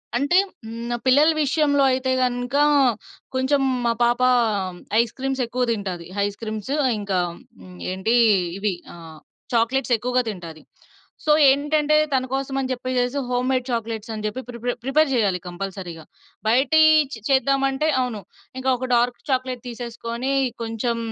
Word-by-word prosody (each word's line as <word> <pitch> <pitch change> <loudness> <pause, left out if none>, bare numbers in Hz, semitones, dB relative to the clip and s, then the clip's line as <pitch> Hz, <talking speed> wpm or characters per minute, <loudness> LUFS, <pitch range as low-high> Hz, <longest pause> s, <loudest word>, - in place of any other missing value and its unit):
అంటే 285 +8 +2 0.3
హ్మ్, 230 +2 -5
పిల్లల 290 +5 +5
విషయంలో 285 0 +2
అయితే 260 0 -1
గనుక 245 +1 -2 0.8
కొంచెం 265 +2 +2 0.2
మా 235 - +3
పాప 240 +1 +2 0.8
ఐస్ 235 -1 +1
క్రీమ్స్ 270 0 -2
ఎక్కువ 250 +2 -2
తింటాది. 190 -6 -4 0.2
ఐస్ 205 0 -4
క్రీమ్స్, 220 +3 -5 0.3
ఇంకా 200 -3 -1 0.4
హ్మ్. 90 -1 -13
ఏంటి? 190 +5 0 0.4
ఇవి 200 0 -1 0.2
ఆహ్, 165 -2 -12 0.3
చాక్లేట్స్ 240 +2 +1
ఎక్కువగా 250 +3 0
తింటాది. 170 -6 -8 0.6
సో 305 - +3 0.2
ఏంటంటే 295 +2 +2 0.2
తన 260 -1 +1
కోసం 270 0 -2
అని 260 - -2
జెప్పేసేసి 255 +1 -1
హోమ్మేడ్ 255 +1 0
చాక్లేట్స్ 230 -2 -3
అని 215 -1 -6
జెప్పి 215 +5 -3
ప్రిపర్ 245 0 -3
ప్రిపేర్ 280 +3 +2
జేయాలి 200 -7 +1
కంపల్సరీ‌గా. 180 -2 -6 0.4
బయటియి 290 +7 +5 0.2
చ్ - - -3
చేద్దాం 275 0 +3
అంటే 270 +3 -1
అవును. 240 -5 -3 0.4
ఇంకా 260 0 -1
ఒక 255 - -4
డార్క్ 240 +1 +1
చాక్లేట్ 255 -2 -1
తీసేసుకొని 235 +2 -5 0.3
కొంచెం 225 +1 -2
245 Hz, 135 wpm, -22 LUFS, 220-265 Hz, 0.8 s, పిల్లల